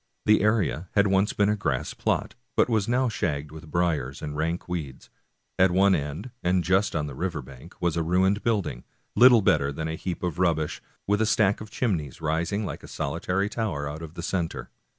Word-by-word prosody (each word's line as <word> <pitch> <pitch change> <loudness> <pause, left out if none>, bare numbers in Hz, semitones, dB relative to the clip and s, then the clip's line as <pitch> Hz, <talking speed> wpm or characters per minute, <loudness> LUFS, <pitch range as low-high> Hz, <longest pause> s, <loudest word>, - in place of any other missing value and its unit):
The 105 - +5
area 100 -5 +1
had 100 -1 +4
once 95 +1 +2
been 100 - +2
a 105 - +2
grass 105 - -2
plot, - - -1 0.2
but - - +4
was 110 -3 +1
now 125 +2 +2
shagged 75 -9 -2
with 80 0 -11
briers 80 -6 0
and 75 -1 -4
rank 80 +3 -2
weeds. 75 -7 -6 0.5
At 95 +1 +6
one 95 +2 +4
end, 75 - -3
and 90 0 +2
just 95 +4 +2
on 75 -2 0
the 70 - -6
river 85 0 -3
bank, 65 -1 -14
was 85 -2 0
a 85 - +1
ruined 95 +5 +2
building, 100 - -1 0.3
little 120 -3 +7
better 70 -6 +3
than 80 +3 -4
a 80 - -3
heap 85 +2 -5
of 90 -1 -2
rubbish, 80 -4 0 0.2
with 105 +1 +1
a 110 - +2
stack 105 -2 +2
of 110 - -8
chimneys 85 - -2
rising 85 +6 -1
like - - -5
a - - -11
solitary 90 +7 -1
tower 105 -10 -2
out 75 +2 -6
of 80 0 -9
the 85 - -6
center. 85 -2 -3
90 Hz, 205 wpm, -26 LUFS, 75-100 Hz, 0.5 s, little